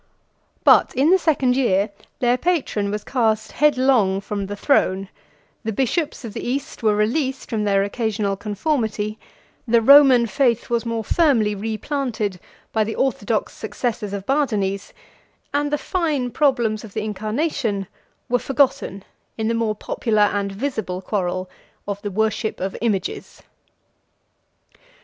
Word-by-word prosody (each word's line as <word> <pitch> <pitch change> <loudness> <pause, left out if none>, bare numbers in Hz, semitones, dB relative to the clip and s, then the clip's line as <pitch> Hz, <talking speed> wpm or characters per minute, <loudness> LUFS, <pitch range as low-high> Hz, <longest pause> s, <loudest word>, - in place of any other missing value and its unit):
But - - +5
in 280 +6 +3
the 380 - +5
second 275 -7 +2
year, 205 -6 +2 0.3
their 245 0 +3
patron 255 - 0
was 210 +1 -3
cast 220 -4 0
headlong 255 -9 +3
from 200 0 -4
the 205 - -5
throne, 195 -5 +1 0.5
the 220 - -2
bishops 270 - -1
of 220 - -7
the - - -5
East 275 +4 -3
were 215 -2 +3
released 260 +6 -1
from 215 -2 0
their 195 -1 +3
occasional 205 -1 -1
conformity, 215 0 -2 0.5
the 235 0 +5
Roman 265 0 +7
faith 235 +1 +1
was 235 0 0
more 230 -1 -2
firmly 230 - +2
replanted 220 -1 -3 0.3
by 220 - +3
the 220 +1 -4
orthodox 225 -4 -1
successors 220 0 -3
of 200 -1 -5
Bardanes, 210 -9 0 0.6
and 290 0 +1
the 295 - +2
fine 295 -8 -1
problems 235 -7 +1
of 220 -2 -12
the 215 - -1
incarnation 215 - -2 0.4
were 245 0 +1
forgotten 250 -8 0 0.3
in 220 0 -1
the - - +1
more 225 -2 0
popular 215 0 0
and 200 -1 -1
visible 195 -5 -3
quarrel 185 -2 -2 0.4
of 200 0 -4
the 205 - -3
worship 220 +2 -1
of 190 +1 -3
images. 205 -5 -3
220 Hz, 140 wpm, -22 LUFS, 205-265 Hz, 0.6 s, Roman